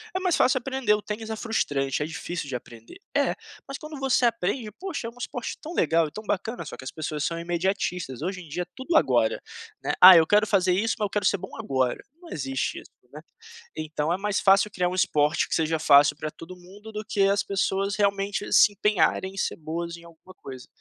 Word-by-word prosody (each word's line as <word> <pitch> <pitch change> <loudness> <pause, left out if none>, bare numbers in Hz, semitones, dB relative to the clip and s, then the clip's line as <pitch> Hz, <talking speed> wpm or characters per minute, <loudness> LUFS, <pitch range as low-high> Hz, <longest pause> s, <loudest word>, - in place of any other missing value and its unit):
é - - +1
mais 370 -2 +1
fácil 260 +1 +3
aprender. 265 -3 0
O 210 - 0
Tênis 215 +2 -6
é - - -2
frustrante, 145 - -1
é - - -2
difícil 165 0 -5
de 130 - -3
aprender, 115 - -10 0.2
é, - - +1 0.3
mas 275 - -6
quando 305 -1 -8
você 265 -2 +2
aprende, 230 +1 -2
poxa, 355 - -5
é - - -4
um 235 - -18
esporte 245 - -5
tão 325 +2 -7
legal, 165 - +2
e - - -11
tão 215 - -8
bacana, 210 +4 -3
só - - -7
que - - -10
as 130 - -6
pessoas 155 -1 -4
são 165 0 -2
imediatistas. 175 -5 -2
Hoje 185 +3 -3
em 170 - -13
dia 170 +5 -3
é - - -12
tudo 265 +6 -3
agora, - - +2 0.4
né, - - -1
"ah, 185 0 +12
eu 160 -1 +4
quero 210 +3 +4
fazer 185 -3 +2
isso, 210 +4 0
mas 210 - +1
eu - - -3
quero 205 -1 -2
ser 200 - +3
bom 190 +1 -9
agora.", 130 -2 0 0.2
não 345 - -13
existe 135 -2 -3
isso, - - -19 0.2
né, - - -10 0.5
então 155 +1 -2
é - - -1
mais 210 0 -1
fácil 195 +2 +4
criar 180 -2 0
um 180 - -3
esporte 150 -3 +1
que - - 0
seja 160 0 0
fácil 145 -1 +6
pra 155 - -5
todo 165 +4 -11
mundo, 195 +5 -13
do 215 0 -5
que 210 -2 0
as 200 +1 +2
pessoas 195 0 -1
realmente 200 0 -1
se 210 - +7
empenharem 195 -2 +1
em - - -13
ser - - -1
boas 170 +2 -5
em 170 - -15
alguma 170 +2 -16
coisa. 130 -6 -10
190 Hz, 230 wpm, -25 LUFS, 160-210 Hz, 0.5 s, ah